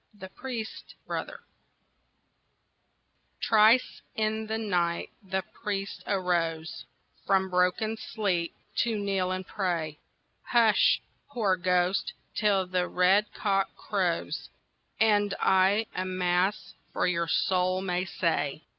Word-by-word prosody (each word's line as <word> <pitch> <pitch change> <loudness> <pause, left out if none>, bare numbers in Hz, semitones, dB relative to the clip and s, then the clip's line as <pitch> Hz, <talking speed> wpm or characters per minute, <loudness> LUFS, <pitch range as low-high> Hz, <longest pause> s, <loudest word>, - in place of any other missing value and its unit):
THE 190 -2 -9
PRIEST'S 235 -1 -7
BROTHER - - -5 2.1
Thrice 220 +3 +4
in 220 -1 -1
the 220 +1 -1
night 175 -6 -1
the 190 -1 -2
priest 200 -1 -5
arose 170 -4 -1 0.4
From 190 -1 +2
broken 180 +5 +1
sleep 185 -7 -2 0.2
to 230 -3 +1
kneel 195 -2 0
and 185 0 -3
pray. 170 -7 -2 0.4
"Hush, 225 -4 +4 0.3
poor 220 -9 +1
ghost, 180 +1 +1 0.2
till 200 -3 +2
the 180 0 -1
red 190 +4 +3
cock 195 -2 0
crows, - - -2 0.5
And 205 -2 +3
I 190 +4 +3
a 185 - -2
Mass 185 +2 0 0.2
for - - 0
your 170 -2 0
soul 185 +2 +1
may 180 -1 -1
say." 160 -5 -1
190 Hz, 110 wpm, -28 LUFS, 180-210 Hz, 2.1 s, Thrice